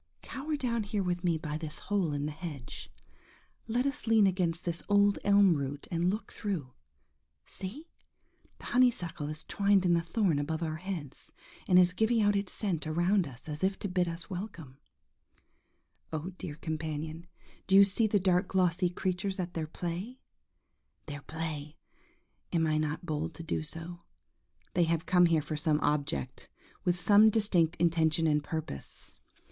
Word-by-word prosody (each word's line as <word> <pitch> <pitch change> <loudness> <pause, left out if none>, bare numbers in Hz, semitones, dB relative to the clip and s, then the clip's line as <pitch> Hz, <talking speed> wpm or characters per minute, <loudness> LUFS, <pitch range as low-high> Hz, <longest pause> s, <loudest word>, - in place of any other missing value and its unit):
Cower 300 +3 -4
down 240 -5 -1
here 205 -1 -2
with 175 0 -2
me 170 -2 +2
by 155 -1 -4
this 155 -2 -6
hole 195 -6 -1
in 145 0 -2
the 150 - -2
hedge;–let 170 - -7
us 280 -2 -3
lean 220 -2 +5
against 180 -3 0
this 170 -1 -2
old 205 0 +4
elm 200 -2 +5
root 140 0 -4
and 170 +1 +1
look 210 +4 -3
through. 170 - -4 0.7
See! 235 - -6 0.7
the - - -13
honeysuckle 175 -12 +1
is 155 0 -4
twined 200 -2 +2
in 175 - +4
the 170 - +3
thorn 170 -2 +1
above 160 +3 -2
our 155 -1 -2
heads, 165 -6 -6 0.4
and 180 - +5
is 180 0 +6
giving 220 +4 +2
out 205 -1 +3
its 200 -2 -1
scent 175 -7 -1
around 175 +3 +2
us, 125 0 -11
as 150 +1 -5
if 190 +1 +1
to - - -4
bid 180 -1 +1
us 165 0 -5
we1come 175 -8 -7 1.3
Oh, 160 +4 -4
dear 150 -4 -5
companion, 160 +1 -5 0.4
do 190 - +4
you 200 - +10
see 200 +3 +3
the 205 -1 +2
dark 180 0 +2
glossy 180 -1 +2
creatures 190 +2 -2
at 175 -1 -3
their 160 -3 -3
play? 175 +10 -5 0.9
Their 145 -1 -7
play? 155 -1 -5 0.7
am 165 -2 +2
I 155 -1 +1
not 155 +3 -2
bold 155 0 -3
to 165 - -7
do 165 - -2
so? 165 +2 -4 0.7
They 175 - +3
have 165 +1 0
come 180 -1 +5
here 160 -3 +2
for 155 +1 -4
some 150 0 +1
object,–with 150 - -2
some 205 +4 +6
distinct 195 -7 +2
intention 165 -1 +2
and 150 -2 +2
purpose. 155 - -6
175 Hz, 165 wpm, -30 LUFS, 155-195 Hz, 1.3 s, you